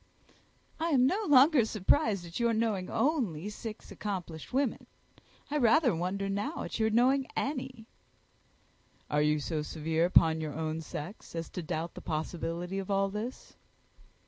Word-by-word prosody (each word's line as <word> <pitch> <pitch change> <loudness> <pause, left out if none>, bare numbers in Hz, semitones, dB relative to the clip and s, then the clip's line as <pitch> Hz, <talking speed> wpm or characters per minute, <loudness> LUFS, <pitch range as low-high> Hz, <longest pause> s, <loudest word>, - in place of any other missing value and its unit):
"I 325 - 0
am 260 -5 +4
no 405 +10 +1
longer 280 -1 +6
surprised 215 - +1
at 170 +4 -6
your 235 -1 +2
knowing 215 -5 0
only 215 - 0
six 215 +1 -8
accomplished 180 -6 -5
women. 265 -1 -1 0.6
I 300 - +1
rather 245 - +4
wonder 185 +4 -2
now 205 +11 -2
at - - -5
your 220 0 +3
knowing 255 +4 +3
any." 260 -5 -3 1.3
"Are 150 0 +3
you 150 0 +2
so 155 +1 -2
severe 160 +2 0
upon 160 -2 +4
your 155 -2 -4
own 160 0 -2
sex 160 +4 -8
as 165 0 -4
to 180 - -5
doubt 160 +1 -3
the - - -9
possibility 170 +3 -3
of 195 - -6
all 195 0 +2
this?" 215 +5 -6
195 Hz, 150 wpm, -30 LUFS, 165-245 Hz, 1.3 s, longer